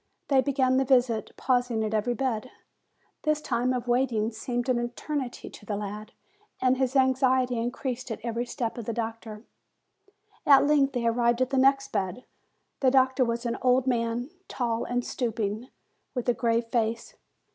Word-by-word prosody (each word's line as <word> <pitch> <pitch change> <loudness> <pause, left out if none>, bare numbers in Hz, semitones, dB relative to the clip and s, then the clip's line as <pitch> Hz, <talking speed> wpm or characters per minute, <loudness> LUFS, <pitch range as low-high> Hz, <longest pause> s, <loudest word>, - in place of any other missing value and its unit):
They 270 -2 +5
began 260 -1 +2
the 265 - +3
visit, 245 -4 +2
pausing 245 -3 +1
at 215 0 -2
every 225 +3 0
bed. 255 -1 -2 0.7
This 305 -1 +1
time 250 -3 0
of 250 -1 -2
waiting 240 -3 +1
seemed 240 +2 -3
an 250 -2 +2
eternity 245 +2 -4
to - - -13
the 205 0 -3
lad, 210 +2 -6 0.5
and 255 0 +3
his 260 0 0
anxiety 260 -2 +3
increased 250 +2 -3
at 225 - -4
every 235 +1 -2
step 240 0 -3
of 230 - -6
the 230 - -2
doctor. 225 -1 -5 1.0
At 280 -1 +6
length 285 -2 +3
they 245 -2 -1
arrived 235 +1 +2
at 255 - -5
the 270 - +1
next 275 +1 +3
bed. 190 +6 -2 0.5
The 265 - +4
doctor 260 0 +3
was 235 0 -2
an 235 - -2
old 255 0 +3
man, 240 +1 -1 0.2
tall 235 -2 -2
and 245 0 -2
stooping, 220 -1 -2 0.5
with 250 -1 -3
a 245 - +4
grave 230 -1 +1
face. 230 - -1
245 Hz, 170 wpm, -27 LUFS, 230-260 Hz, 1.0 s, At